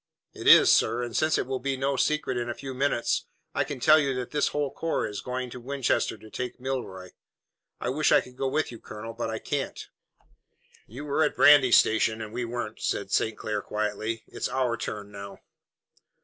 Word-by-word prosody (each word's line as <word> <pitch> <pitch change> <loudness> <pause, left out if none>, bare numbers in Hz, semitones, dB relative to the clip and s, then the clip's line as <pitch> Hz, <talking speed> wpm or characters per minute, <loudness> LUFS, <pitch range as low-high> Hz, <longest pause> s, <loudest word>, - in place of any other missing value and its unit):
"It - - -6
is, - - +9
sir, 120 +1 +3
and 120 -1 -6
since 155 0 +2
it - - -1
will 130 0 -3
be 135 +1 -2
no 135 +1 0
secret 145 0 0
in 120 0 -2
a 120 - -3
few 135 -1 -7
minutes, 130 -2 0 0.3
I 140 - +1
can 140 -1 -6
tell 155 +6 +6
you 140 -3 0
that 125 -1 -4
this 145 -1 +1
whole 145 -2 -1
corps 165 - -1
is 105 -1 -6
going 125 0 -4
to 125 - -8
Winchester 130 -2 -1
to 110 +1 -15
take 125 -1 -5
Milroy. 120 -9 -5 0.7
I - - -2
wish 145 +3 +1
I - - +7
could 125 - -10
go 135 +1 -2
with 155 +2 -1
you, 115 - -10
Colonel, 110 +1 -8
but 115 0 -3
I 110 - -3
can't." 140 +4 -3 1.1
"You 130 +7 -8
were 145 +2 0
at 150 - 0
Brandy 140 -4 +7
Station, 110 0 +4
and 110 -1 -7
we 120 0 -2
weren't," 115 -2 -5
said - - -2
St. 110 - +1
Clair 105 -1 -3
quietly. 110 +2 -3
"It's - - -4
our 130 -3 0
turn 105 -3 -6
now." 100 0 -9
125 Hz, 205 wpm, -27 LUFS, 110-135 Hz, 1.1 s, is